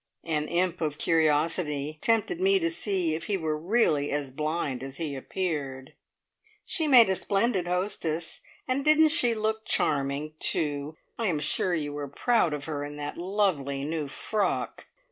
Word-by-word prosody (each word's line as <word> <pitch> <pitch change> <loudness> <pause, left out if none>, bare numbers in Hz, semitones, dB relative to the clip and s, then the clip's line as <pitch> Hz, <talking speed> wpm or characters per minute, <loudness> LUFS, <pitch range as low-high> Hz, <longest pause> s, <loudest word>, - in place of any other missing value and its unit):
An 155 -2 -1
imp 180 +1 0
of 150 -2 -1
curiosity 155 -2 +1
tempted 230 - +1
me 390 +1 +4
to 335 -2 0
see 190 - 0
if 165 +1 -4
he 200 +1 0
were 160 -3 -1
really 155 -4 +1
as 145 -2 -2
blind 150 -2 -2
as 135 0 -6
he 155 -4 -3
appeared. 140 -3 -4 0.7
"She 320 -4 -1
made 250 -5 +8
a 190 - +1
splendid 195 -2 0
hostess. 175 -3 -2 0.3
And 265 +2 0
didn't 310 +1 +6
she 245 -7 +3
look 220 0 -1
charming, 140 -1 0
too? 150 0 -1 0.2
I 230 - 0
am 170 -5 +1
sure 175 +4 +1
you 145 -2 -3
were 145 -1 -4
proud 220 - +1
of 150 -1 -4
her 145 -2 -3
in 145 0 -6
that 145 0 -5
lovely 170 -8 -1
new 155 -1 -2
frock!" 205 +9 -2
160 Hz, 165 wpm, -27 LUFS, 145-205 Hz, 0.7 s, made